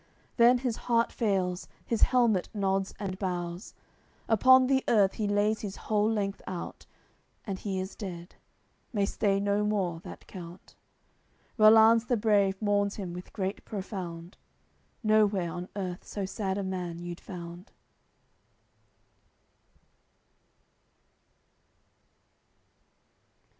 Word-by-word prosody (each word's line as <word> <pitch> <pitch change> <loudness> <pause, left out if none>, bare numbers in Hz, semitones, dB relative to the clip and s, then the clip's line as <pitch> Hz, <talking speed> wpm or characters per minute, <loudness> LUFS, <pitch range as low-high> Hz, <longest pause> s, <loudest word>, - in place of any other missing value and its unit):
Then 240 +1 +6
his 245 -2 -2
heart 230 -1 +3
fails; 190 -5 -1 0.2
his 230 - -2
helmet 235 -7 +3
nods 195 -1 0
and 190 -2 -4
bows; 175 0 -4 0.5
Upon 255 +4 +6
the 265 0 +2
earth 200 -4 +4
he 215 - -2
lays 205 +1 +1
his 195 -2 -5
whole 210 0 0
length 200 -2 -2
out: 175 - -6 0.6
And 195 -4 -4
he 195 -2 -3
is 190 +1 -5
dead, 175 -4 -7 0.6
may 205 -5 +1
stay 195 -1 0
no 205 +1 +1
more, 195 -6 -1
that - - -11
count. 175 -1 -11 0.8
Rollanz 220 +1 +7
the 245 - +2
brave 200 -3 +2
mourns 205 -1 +1
him 185 -4 -5
with 180 +1 -9
grief 195 0 -3
profound; 185 -4 -6 0.7
Nowhere 210 -5 +3
on 180 +2 -6
earth 185 -3 -4
so 200 -2 -4
sad 195 0 -3
a 200 - -2
man 180 -3 -4
you'd 175 0 -7
found. 175 0 -9
200 Hz, 115 wpm, -29 LUFS, 185-215 Hz, 0.8 s, Rollanz